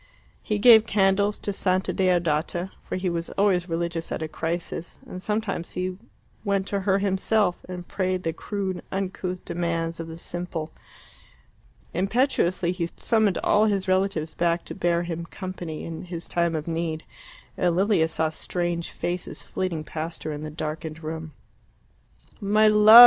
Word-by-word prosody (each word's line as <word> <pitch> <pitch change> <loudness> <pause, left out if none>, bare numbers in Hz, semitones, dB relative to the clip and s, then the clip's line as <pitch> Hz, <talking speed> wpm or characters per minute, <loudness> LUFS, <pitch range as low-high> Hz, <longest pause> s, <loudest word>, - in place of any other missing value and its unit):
He 210 - -1
gave 220 0 +8
candles 200 0 +3
to 205 - -2
Santa 185 -1 +1
Deodata, 175 -1 +1
for - - -4
he 185 0 -1
was 170 -1 -1
always 190 -3 +3
religious 165 0 -2
at - - -2
a - - -2
crisis, 165 +1 -4
and 185 - -7
sometimes 210 -4 -2
he 185 +1 -2 0.5
went 200 -2 +1
to 200 - 0
her 195 0 +2
himself 195 0 +1
and 180 -1 -6
prayed 185 -1 -1
the 165 - 0
crude 190 0 -3
uncouth 185 -1 -3
demands 170 -1 -1
of 165 - -4
the 165 0 -7
simple. 170 -2 -4 1.2
Impetuously 185 -3 +2
he 175 -2 -2
summoned 220 -4 +3
all 210 +1 +5
his 200 -2 +1
relatives 185 -4 +1
back 170 0 +1
to - - -6
bear 175 -2 +1
him 170 -1 -3
company 180 -5 -6
in 165 +1 -6
his 170 -1 -6
time 170 -1 +1
of 155 0 -3
need, 165 -1 -2 0.5
and 175 -2 +2
Lilia 190 -3 +4
saw 160 0 0
strange 175 +1 -2
faces 175 +1 -4
flitting 175 -4 -2
past 160 +2 -5
her 155 - -2
in 145 0 -5
the 155 - -4
darkened 155 +1 -5
room. 160 0 -5 1.1
"My 215 +1 +4
love!" 215 +2 +10
180 Hz, 155 wpm, -26 LUFS, 165-195 Hz, 1.2 s, love